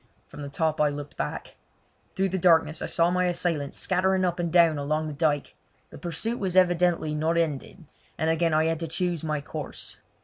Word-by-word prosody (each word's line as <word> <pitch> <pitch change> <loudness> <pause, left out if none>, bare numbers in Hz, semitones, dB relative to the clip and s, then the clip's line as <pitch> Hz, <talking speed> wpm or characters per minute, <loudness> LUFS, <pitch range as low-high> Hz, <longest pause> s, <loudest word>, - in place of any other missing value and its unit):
From - - -10
the 140 - -6
top 155 +1 0
I 150 - +4
looked 145 0 -7
back. - - -5 0.6
Through 195 0 +1
the 190 +1 -2
darkness 165 -2 +3
I - - -2
saw 170 +1 +2
my 180 0 +1
assailants 170 -5 -1
scattering 185 0 +1
up 175 -1 -1
and 170 -1 -1
down 165 -3 +5
along 155 +2 -1
the 155 - -4
dyke. 145 -1 0 0.4
The - - -11
pursuit 200 +9 -2
was 185 -3 -2
evidently 175 -3 +3
not 160 +2 0
ended, 165 +2 -2 0.3
and 160 - 0
again 165 +1 +2
I 155 +1 +3
had 165 -1 0
to 165 - -3
choose 175 0 -1
my 155 -2 -1
course. 150 0 -6
165 Hz, 200 wpm, -26 LUFS, 155-175 Hz, 0.6 s, down